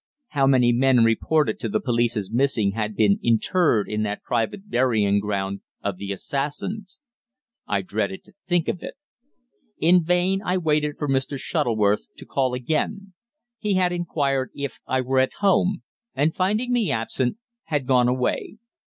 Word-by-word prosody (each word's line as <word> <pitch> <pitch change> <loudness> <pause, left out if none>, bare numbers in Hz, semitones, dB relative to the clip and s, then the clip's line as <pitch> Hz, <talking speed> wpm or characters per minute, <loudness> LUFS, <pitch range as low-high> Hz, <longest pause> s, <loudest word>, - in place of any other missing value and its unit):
How 140 -2 +2
many 125 -3 +4
men 125 0 +4
reported 150 - +2
to - - -3
the 215 - 0
police 120 - 0
as 100 -1 -4
missing 120 -5 +2
had 105 0 -3
been 100 -1 +3
interred 120 - +2
in 105 0 -2
that 105 -1 -3
private 125 - -2
burying 110 - +2
ground 100 -1 -3 0.2
of 100 -2 -2
the 100 +1 -5
assassins! 150 - -4 0.7
I 100 -2 0
dreaded 100 0 -3
to 200 - -21
think 175 -2 +1
of 180 - -2
it. - - -7 0.8
In 175 +2 +4
vain 180 +3 +1
I 180 0 0
waited 150 -3 0
for 150 - -3
Mr. 135 +1 0
Shuttleworth 110 -5 0
to - - -9
call 130 -2 0
again. 185 - -2 0.5
He 210 -3 0
had 180 -1 +2
inquired 140 -7 -1
if 140 -1 -5
I 130 0 +1
were 130 +1 +1
at 130 0 +2
home, 195 -1 +1 0.3
and, 150 +4 +2
finding 215 +7 0
me 235 -5 +1
absent, 120 - -1 0.3
had 145 -4 -1
gone 125 -2 +3
away. 125 +11 -1
135 Hz, 160 wpm, -23 LUFS, 115-175 Hz, 0.8 s, many